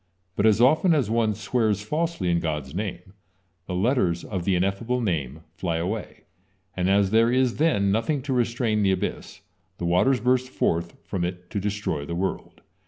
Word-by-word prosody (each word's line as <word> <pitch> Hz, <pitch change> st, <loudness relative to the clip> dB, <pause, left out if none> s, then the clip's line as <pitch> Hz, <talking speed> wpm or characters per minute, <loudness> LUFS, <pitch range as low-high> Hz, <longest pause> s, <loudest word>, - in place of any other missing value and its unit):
But 105 Hz, -, +3 dB
as 110 Hz, -1 st, +4 dB
often 155 Hz, +7 st, +4 dB
as 125 Hz, -8 st, 0 dB
on 115 Hz, -2 st, +1 dB
swears 110 Hz, 0 st, 0 dB
falsely 150 Hz, -, -1 dB
in 85 Hz, -, +2 dB
God's 75 Hz, -4 st, -3 dB
name, 90 Hz, -1 st, -5 dB, 0.5 s
the 90 Hz, -, -3 dB
letters 95 Hz, -5 st, +1 dB
of 95 Hz, -4 st, -4 dB
the 95 Hz, -, +2 dB
Ineffable 100 Hz, +7 st, 0 dB
Name 80 Hz, -, -2 dB
fly 85 Hz, -2 st, -2 dB
away, 95 Hz, +5 st, -4 dB, 0.5 s
and 90 Hz, 0 st, 0 dB
as 100 Hz, 0 st, +3 dB
there 115 Hz, +2 st, +4 dB
is 130 Hz, -1 st, +2 dB
then 105 Hz, -11 st, +2 dB
nothing 125 Hz, +6 st, 0 dB
to 135 Hz, -1 st, -2 dB
restrain 115 Hz, -3 st, +1 dB
the 95 Hz, -1 st, +3 dB
abyss, -, -, -4 dB, 0.4 s
the 85 Hz, -, -4 dB
waters 90 Hz, +10 st, +3 dB
burst 130 Hz, +1 st, +1 dB
forth 85 Hz, -8 st, -1 dB
from 95 Hz, -3 st, -3 dB
it 90 Hz, 0 st, -5 dB
to 100 Hz, -, -1 dB
destroy 100 Hz, -7 st, -2 dB
the 85 Hz, +4 st, -5 dB
world. 95 Hz, +2 st, -4 dB
100 Hz, 175 wpm, -25 LUFS, 90-120 Hz, 0.5 s, as